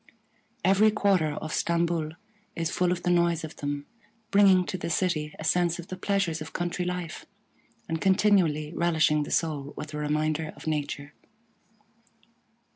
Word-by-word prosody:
Every 195 +3 +5
quarter 195 -7 +2
of 155 +1 -5
Stamboul 170 -2 0 0.4
is 165 -1 -2
full 180 -1 +1
of 175 -1 -2
the 180 - +2
noise 170 -2 +2
of 160 - -8
them, 145 0 -3 0.5
bringing 195 -2 +6
to - - -4
the - - -3
city 160 -3 0
a - - -7
sense 175 +1 +2
of 175 0 -9
the 185 - -4
pleasures 185 -4 -1
of 155 - -7
country 175 0 -2
life, 180 -2 -4 0.6
and 160 -1 -3
continually 185 -6 +3
relishing 160 -3 +2
the 145 - -4
soul 150 -4 -1
with 150 0 -7
a - - -3
reminder 155 +1 -1
of - - -13
nature. 145 -2 -3
165 Hz, 155 wpm, -27 LUFS, 155-180 Hz, 0.6 s, bringing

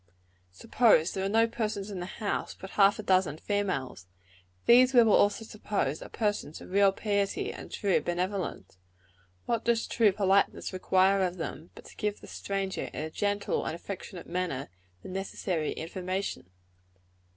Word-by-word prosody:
Suppose 165 - +3
there 190 - -2
are 195 - 0
no 225 +2 +4
persons 215 -3 -3
in 190 - -5
the 180 - -5
house, 205 +1 -3
but 190 - -9
half 200 0 +4
a 215 - -6
dozen 185 -6 +2
females. 180 - -2 0.6
These, 255 +2 +6
we 240 - +9
will 220 -2 +4
also 205 +2 +3
suppose, 205 -9 -2
are - - -9
persons 205 -8 -2
of - - -12
real 200 0 +5
piety 200 0 -1
and - - -10
true 200 -3 +1
benevolence. 180 - -3 0.7
What 230 -1 -1
does 235 -1 +1
true 220 -3 +3
politeness 195 0 +1
require 190 +1 +3
of 180 -1 -1
them, 160 -1 -6
but - - -13
to - - -13
give 210 -1 -2
the - - -12
stranger, 195 -1 -3
in - - -5
a 160 - -5
gentle 205 +3 -1
and - - -3
affectionate 185 0 -8
manner, 175 -7 -3 0.3
the - - -8
necessary 185 -4 -2
information? 185 - -4
195 Hz, 160 wpm, -29 LUFS, 180-205 Hz, 0.7 s, we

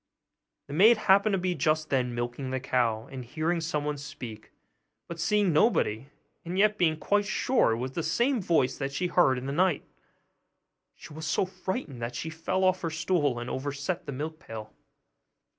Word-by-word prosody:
The 140 - -9
maid 215 +9 +6
happened 200 0 +4
to - - +3
be 180 0 0
just 155 0 0
then 125 -3 +1
milking 120 +3 -3
the 130 0 -1
cow; 120 -4 0
and 130 -2 -6
hearing 160 +7 -1
someone 150 -3 -2
speak, 120 -6 -9 0.6
but 170 -1 -7
seeing 205 0 +2
nobody, 135 - +2 0.4
and 175 +2 -4
yet 210 +1 +3
being 160 -3 +3
quite 205 +6 +1
sure 230 - +2
it - - -2
was 130 +2 -3
the 165 - -3
same 235 - +1
voice 165 -8 +1
that 135 -1 -2
she 175 +6 -1
had - - -14
heard 135 -8 +5
in 125 - -5
the 140 - -2
night, 175 -1 +2 1.1
she - - -12
was 155 +1 -6
so - - +1
frightened 185 - -5
that 120 +1 -4
she 160 +6 -4
fell 185 +4 -1
off 185 0 +3
her 165 - -1
stool, 155 -4 0
and 120 +1 -5
overset 140 +6 -3
the - - -3
milk 155 +4 -5
pail. 110 -1 -9
155 Hz, 190 wpm, -28 LUFS, 130-185 Hz, 1.1 s, maid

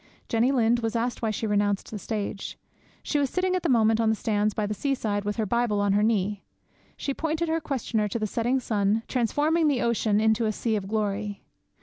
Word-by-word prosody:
Jenny 235 +3 +3
Lind 240 -2 +3
was 225 -1 -2
asked 240 +1 -1
why 225 - 0
she 215 +1 -2
renounced 205 -1 0
the 215 - -5
stage. 205 -2 -4 0.5
She 295 - 0
was 280 -2 +1
sitting 370 +3 0
at 365 - 0
the 340 - -1
moment 225 -2 +4
on 225 - +2
the 220 - +2
sands 210 -1 0
by 215 - 0
the 210 - -2
seaside, 215 -4 -1
with 205 0 -1
her 220 - 0
Bible 235 -1 +1
on 205 -1 +2
her 205 - +3
knee. 205 -2 0 0.5
She 275 - -2
pointed 320 +3 -1
her 325 0 0
questioner 240 -7 -1
to 205 - -3
the 215 - -1
setting 240 +5 0
sun, 215 -2 0
transforming 295 +7 +1
the 275 -4 +1
ocean 220 -3 +2
into 220 +1 +2
a - - +1
sea 220 +1 -1
of 195 -2 -3
glory. 205 -1 -2
225 Hz, 220 wpm, -26 LUFS, 210-245 Hz, 0.5 s, moment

